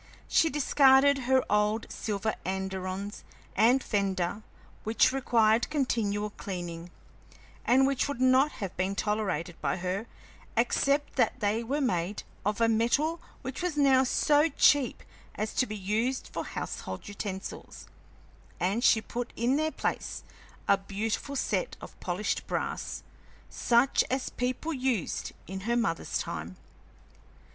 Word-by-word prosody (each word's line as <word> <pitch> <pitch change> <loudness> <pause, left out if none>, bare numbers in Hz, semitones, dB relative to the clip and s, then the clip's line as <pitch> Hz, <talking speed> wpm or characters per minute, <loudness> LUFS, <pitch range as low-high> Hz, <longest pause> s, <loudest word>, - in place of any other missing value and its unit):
She 325 - +4
discarded 275 -1 +4
her 260 -1 +4
old 210 +2 +1
silver 215 0 -2
andirons 190 +1 -4 0.3
and 245 +6 +4
fender, 195 -1 -1 0.4
which 220 +3 +3
required 235 -4 +3
continual 215 -8 0
cleaning, 175 -4 -6 0.8
and 260 +2 +5
which 275 -1 +1
would 285 -3 -4
not 260 +3 +4
have 195 -3 -5
been 190 +2 -1
tolerated 195 -6 -2
by - - 0
her 185 +5 -3 0.5
except 275 +5 +1
that 255 - +2
they 215 +1 0
were 280 +6 -1
made 200 -6 -1 0.2
of 210 +2 -1
a 230 - +4
metal 260 +9 +1 0.2
which 260 +4 -5
was 350 -4 -2
now 270 -2 +5
so 295 +4 +3
cheap 280 -3 +3 0.3
as 215 +1 -3
to 255 - +1
be 215 - -5
used 220 +7 -1
for - - -3
household - - -5
utensils, 200 -1 -6 0.7
and 200 +7 0
she 220 - +5
put 240 +2 -5
in 240 +4 +1
their 310 +2 +1
place - - -3 0.4
a 200 - +4
beautiful 210 +8 -3
set - - -1
of - - -10
polished - - -2
brass, - - -3 0.5
such 240 +3 +3
as 260 0 -1
people 255 +6 -2
used 255 - -1
in 190 +1 -6
her 240 - +3
mother's 165 -9 -1
time. 85 +4 -5
230 Hz, 135 wpm, -29 LUFS, 200-265 Hz, 0.8 s, and